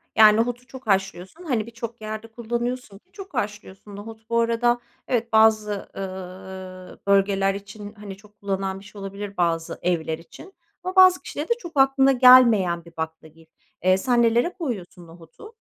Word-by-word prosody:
Ya, 215 -1 +8
nohudu 240 +3 -1
çok 260 -3 -12
haşlıyorsun, 195 - -1
hani, 240 -9 -1
birçok 230 0 -8
yerde 215 +1 -6
kullanıyorsun 235 -1 -4
ki 365 - -28
çok 390 -2 -11
haşlıyorsun. 205 -1 -5
Nohut 220 +2 -11
bu 235 0 +2
arada, 235 +1 +1 0.3
evet, 235 -2 -1
bazı, 215 -2 +3
ııı, 185 -1 -8
bölgeler 195 0 +3
için, 205 +1 -9
hani, 205 -2 -10
çok 210 0 -21
kullanılan 195 -1 -3
bir 200 - -16
şey 210 0 -12
olabilir, 200 0 -7
bazı 165 -2 -1
evler 160 -2 -1
için. 315 - -14 0.3
Ama 370 +1 -4
bazı 370 -1 +7
kişilere 295 - -6
de 470 - +5
çok 340 -6 -10
aklına 270 0 +5
gelmeyen 235 -9 +6
bir 170 -1 -17
baklagil. 160 0 -7 0.4
Eee, 185 +1 +4
sen 240 +4 +2
nelere 235 +9 +2
koyuyorsun 195 - -6
nohudu? 170 - -15
210 Hz, 160 wpm, -23 LUFS, 190-240 Hz, 0.4 s, Ya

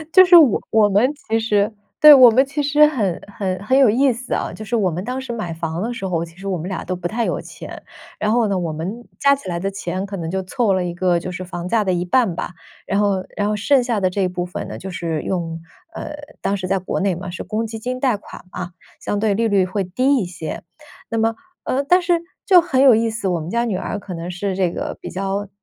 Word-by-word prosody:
就 370 - +10
是 355 -1 +8
我 280 -10 +5
我 220 -2 +5
们 215 +8 +2
其 225 -6 -2
实 210 -1 +1 0.3
对， 300 -1 +10
我 255 -4 +9
们 260 +4 +4
其 285 +2 -3
实 295 +1 +5
很 205 - -1 0.2
很 190 -1 -3
很 260 +5 +3
有 270 -4 +6
意 260 +4 +3
思 245 +2 -6
啊。 - - -2
就 215 - -8
是 215 +2 -8
我 195 -4 +2
们 175 +2 -4
当 250 +4 -3
时 260 -2 -5
买 215 -8 -4
房 165 +1 -4
的 240 +3 -2
时 195 -4 -4
候， 170 -3 -1
其 165 +1 -12
实 195 - -8
我 190 -2 -1
们 170 +3 -5
俩 185 -3 -4
都 185 - -2
不 180 -1 -11
太 230 +4 -1
有 - - -2
钱。 - - -10 0.3
然 210 0 0
后 235 -1 +3
呢， 200 -2 0
我 170 -3 -2
们 185 +10 -5 0.2
加 280 0 +5
起 270 -9 -9
来 170 - -2
的 195 +3 -2
钱 190 -1 -4
可 200 - -6
能 165 -2 -4
就 190 - -1
凑 210 +3 0
了 185 -1 0
一 175 - -3
个 175 -1 +1
就 180 +1 -6
是 180 +1 -5
房 175 -1 -6
价 220 +3 +2
的 190 - 0
一 175 0 -1
半 225 0 +2
吧， 170 - -5 0.3
然 200 - -1
后 195 -2 0
然 205 0 0
后 210 - -1
剩 260 +5 +3
下 235 -4 -1
的 185 - +1
这 190 +1 0
部 180 0 -3
分 180 - -6
呢， - - -6
就 190 - -7
是 170 -3 -3
用， 165 -3 -3 0.3
呃， 305 - -6 0.3
当 200 - 0
时 185 - -4
在 195 0 +1
国 185 - -3
内 195 -1 +1
嘛， 180 +1 -7
是 175 - -6
公 225 +1 -2
积 225 0 -6
金 250 +3 -4
贷 255 -4 +2
款 205 - -12
嘛， 180 0 -5 0.3
相 205 - -2
对 215 -1 +2
利 225 +2 +1
率 195 -2 +3
会 195 +2 -2
低 255 +10 +1
一 215 - 0
些。 170 -3 -6 0.5
那 230 - -2
么， 225 0 +1 0.3
呃， 270 +2 0
但 355 +6 +4
是 345 -1 +1 0.2
就 365 -3 +7
很 270 -6 +1
有 265 -4 +7
意 225 +1 +1
思， 220 -3 -3
我 175 -3 0
们 160 - -6
家 235 +2 0
女 220 -5 -1
儿 205 +3 -3
可 195 - -8
能 170 +1 -5
是 185 +2 -3
这 185 -3 +1
个 - - -4
比 - - -6
较 195 +2 -3
200 Hz, 290 characters per minute, -20 LUFS, 180-240 Hz, 0.5 s, 就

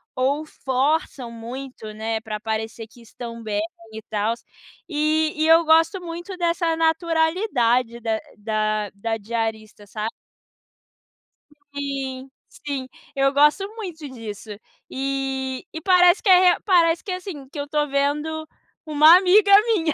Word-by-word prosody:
ou 275 +4 0
forçam 270 -2 -1
muito, 235 -1 -8
né, 220 +1 -3
pra 220 -1 -6
parecer 220 +1 -4
que 235 +2 -19
estão 230 0 -9
bem 210 -1 -1 0.3
e 220 - -7
tals. 220 +2 -1 0.5
E 310 0 +1
e 310 +1 +1
eu 325 +1 +6
gosto 325 +4 +4
muito 345 +2 -7
dessa 340 -1 0
naturalidade 320 - +1
da 225 -2 -1 0.2
da 215 0 -1
da 225 +3 -2
diarista, 220 -1 -4
sa 210 +2 -4 1.7
Sim, 270 -2 -4 0.2
sim, 290 -9 -6 0.3
eu 275 0 +2
gosto 300 +7 +4
muito 340 -8 -7
disso. 225 -4 -9 0.4
E 270 0 -3
e 320 - -6
parece 360 +1 +5
que 420 - 0
é 365 -1 +8
rea 360 -1 +4
parece 340 -4 +3
que, 395 - -5
assim, 365 -7 -6
que 295 - -8
eu 285 - -4
tô 295 0 0
vendo 295 +3 -1 0.4
uma 310 +2 +7
amiga 390 +2 +4 0.2
minha. 335 -9 +1
280 Hz, 135 wpm, -22 LUFS, 230-330 Hz, 1.7 s, é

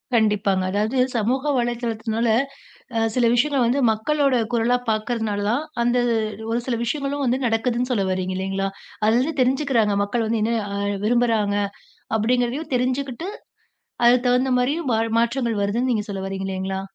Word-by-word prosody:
கண்டிப்பாங்க. 210 -4 +2
அதாவது 215 +6 0 0.2
சமூக 255 +6 +1
வலைதளத்துனால, 235 -1 -1 0.7
அ - - +2 0.2
சில 245 -2 +3
விஷயங்கள் 265 +1 +2
வந்து 255 +4 +1
மக்களோட 275 +5 +1 0.2
குரலா 235 +1 +2
பார்க்கிறதுனாலதான் 215 +2 -1 0.2
அந்த 240 +1 +2 0.5
ஒரு 235 - +1
சில 250 -3 0
விஷயங்களும் 280 +2 -2
வந்து 250 +1 +1
நடக்குதுன்னு 240 +2 0
சொல்ல 200 -5 +1
வர்றீங்க. 185 0 -2
இல்லீங்களா? 195 +1 -1 0.4
அதிலிருந்து 255 +7 +2
தெரிஞ்சுக்கிறாங்க 250 -6 +2
மக்கள் 225 +3 -1
வந்து 225 0 0
என்ன 230 +1 +1 0.2
அ - - -2 0.3
விரும்புறாங்க? 225 -3 +2 0.6
அப்படிங்கிறதையும் 245 +6 0
தெரிஞ்சுக்கிட்டு 255 +6 -2 0.8
அதுக்கு 245 +1 +5
தகுந்த 250 +2 +2
மாதிரியும் 290 +4 -1
மா 220 - +2 0.2
மாற்றங்கள் 235 -3 0
வருதுன்னு 235 +6 0
நீங்க 215 -3 0
சொல்ல 195 -1 -4
வர்றீங்க, 195 0 -4
இல்லீங்களா? 190 0 -3
235 Hz, 140 wpm, -22 LUFS, 215-255 Hz, 0.8 s, அதுக்கு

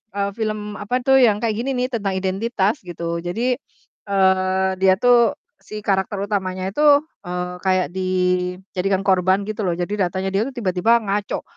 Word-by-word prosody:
eee, 200 0 -1
film 215 -1 -4
apa 205 +4 -2
tuh 265 +1 +5
yang 220 -4 +3
kayak 220 -2 0
gini 265 +3 -2
nih 250 0 0
tentang 195 -2 -2
identitas 195 +2 -1
gitu 170 -1 -4
jadi, 230 +9 -1 0.5
eee, 190 -1 +2
dia 190 0 +5
tuh 240 +2 +4 0.2
si 210 +1 -9
karakter 195 +2 0
utamanya 190 -2 -2
itu, 290 +4 +5 0.2
eee, 180 0 -3
kayak 185 -2 +1
di 185 0 -3 0.6
jadikan 190 +1 0
korban 190 0 +2
gitu 215 +1 -6
loh, 175 - 0
jadi 185 +2 -1
datanya 190 +2 -3
dia 195 +1 +1
itu 275 - -7
tiba-tiba 225 +1 +2
ngaco, 200 0 -2
195 Hz, 165 wpm, -21 LUFS, 185-220 Hz, 0.6 s, tuh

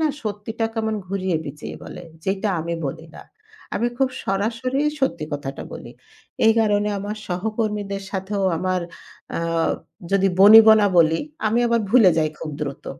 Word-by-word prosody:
না 315 - +3 0.2
সত্যিটা 220 +1 -3
কেমন 220 -1 -1
ঘুরিয়ে-পেঁচিয়ে 165 -7 -3
বলে। - - -9 0.2
যেটা 195 +2 -1
আমি 170 +1 -3
বলি 160 +4 -6
না। - - -10 0.5
আমি 235 - 0
খুব 270 -1 +3 0.2
সরাসরি 230 +7 -1 0.2
সত্যি 265 - 0
কথাটা 140 -1 -5
বলি। - - -9 0.5
এই 225 - +7
কারণে 210 -1 +2
আমার 205 +2 -5
সহকর্মীদের 205 +1 -2
সাথেও 195 +1 -3 0.2
আমার 185 +1 0 0.6
আ - - -2 0.7
যদি 195 0 +3
বনিবনা 220 +1 +8
বলি 165 -1 +4 0.3
আমি 225 +2 +1
আবার 235 0 +2
ভুলে 225 -6 +6
যাই 155 -1 +1
খুব 155 - -5
দ্রুত। 140 -2 -5
200 Hz, 145 wpm, -22 LUFS, 180-220 Hz, 0.7 s, বনিবনা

